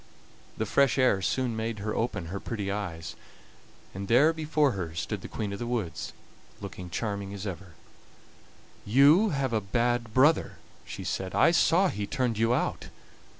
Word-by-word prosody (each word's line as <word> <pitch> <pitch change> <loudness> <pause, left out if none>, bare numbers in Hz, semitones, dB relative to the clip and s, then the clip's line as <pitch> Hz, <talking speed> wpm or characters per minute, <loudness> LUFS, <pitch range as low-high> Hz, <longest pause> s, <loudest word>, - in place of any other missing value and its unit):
The - - -1
fresh 140 -1 +3
air 125 -7 +3
soon 125 +4 -1
made 110 0 -3
her 105 +1 -3
open 105 -7 -2
her 100 - -3
pretty 100 -3 -4
eyes, 85 -6 -5 0.8
and 95 +1 -6
there 140 +9 +5
before 155 -3 +1
her 85 -6 -5
stood 95 +3 -3
the - - -7
Queen 105 -3 -4
of 100 - -6
the 120 - -4
Woods, 110 -10 -3 0.5
looking 90 - -8
as - - -14
charming 100 -1 -3
as 100 +1 -6
ever. 95 -2 -7 1.1
"You 145 - +5
have 135 -6 -1
a 110 - +1
bad 120 +3 0
brother," 145 +7 +3 0.3
she - - -7
said; 95 -1 -3
"I 165 - +5
saw 175 +2 +4
he 100 -7 -4
turned 125 -5 -1
you 115 +1 +3
out. 125 - -1
110 Hz, 170 wpm, -28 LUFS, 100-130 Hz, 1.1 s, there